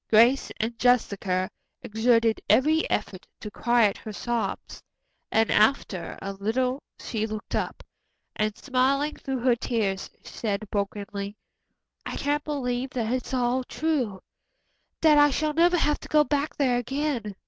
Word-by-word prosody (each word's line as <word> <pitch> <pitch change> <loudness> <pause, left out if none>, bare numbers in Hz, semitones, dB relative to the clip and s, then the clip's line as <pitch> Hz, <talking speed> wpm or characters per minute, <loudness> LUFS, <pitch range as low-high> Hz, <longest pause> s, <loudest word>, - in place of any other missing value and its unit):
Grace 235 +5 +5
and 225 +1 -2
Jessica 200 -7 +2 0.4
exerted 225 +1 +2
every 310 +4 +4
effort 190 -3 -3
to 210 - -7
quiet 235 -2 +2
her 215 - -7
sobs, 235 +2 -3 0.5
and 225 0 +2
after 210 -5 +1
a 195 - -4
little 250 +7 -1 0.2
she 220 -1 -3
looked 215 -1 -7
up, - - -2 0.5
and, 215 -1 -1
smiling 275 +3 +1
through 270 -2 -4
her 245 0 +3
tears, 210 -5 -2
said 210 -2 -3
brokenly: 200 0 -3 0.7
"I - - -5
can't 290 +1 0
believe 260 -3 -2
that 240 -2 -2
it's 255 -1 -3
all 255 0 +1
true 255 -10 -2 0.8
that 305 -2 +6
I 290 0 +7
shall 305 +2 0
never 345 +3 +4
have 295 -2 +1
to - - -11
go 300 -1 +5
back 290 0 -1
there 255 -4 +2
again. 245 -4 -2
245 Hz, 140 wpm, -26 LUFS, 215-275 Hz, 0.8 s, I